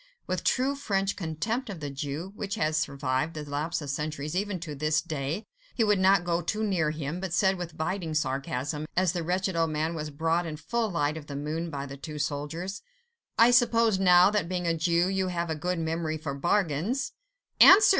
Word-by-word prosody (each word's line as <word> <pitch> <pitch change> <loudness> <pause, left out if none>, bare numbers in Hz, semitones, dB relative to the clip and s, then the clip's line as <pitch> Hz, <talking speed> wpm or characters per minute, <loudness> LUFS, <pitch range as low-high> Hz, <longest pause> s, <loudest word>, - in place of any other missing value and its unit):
With 185 -1 -2
true 265 +2 +2
French 195 -8 -1
contempt 215 +10 -2
of 190 -5 -6
the 145 -2 -5
Jew, 145 +7 -5
which 200 -1 -3
has 155 0 0
survived 140 0 -1
the 150 -1 -6
lapse 150 +3 -2
of 140 - -3
centuries 150 +2 -3
even 200 -1 -1
to 160 -3 -5
this 155 +2 +1
day, 155 +6 -3 0.3
he 230 - +2
would 210 -2 +3
not 190 -1 +5
go 175 0 0
too 215 +6 -2
near 180 -7 +1
him, 155 +2 -4
but 185 -2 -4
said 190 +2 +3
with 175 -3 -7
biting 160 0 -2
sarcasm, 140 +1 -2
as 185 -2 +3
the 175 -1 -2
wretched 185 +2 -1
old 165 -1 +2
man 155 +2 -1
was 155 -2 -4
brought 165 +4 0
in 155 -1 -5
full 225 +9 -1
light 155 -4 0
of 150 -2 -9
the 140 - -6
moon 155 +4 -3
by 140 -3 -4
the 140 0 -8
two 150 +2 -7
soldiers,— 150 +6 -3 0.6
"I 230 +2 +7
suppose 230 -4 +4
now, 180 0 +6
that 205 -5 0
being 180 -1 -2
a 170 - +2
Jew, 170 +2 +2
you 190 -1 0
have 170 -2 -2
a - - 0
good 180 +4 -2
memory 160 -1 -1
for 155 -2 -4
bargains?" 185 - 0 0.5
"Answer!" 400 +3 +9
165 Hz, 205 wpm, -28 LUFS, 150-190 Hz, 0.6 s, Answer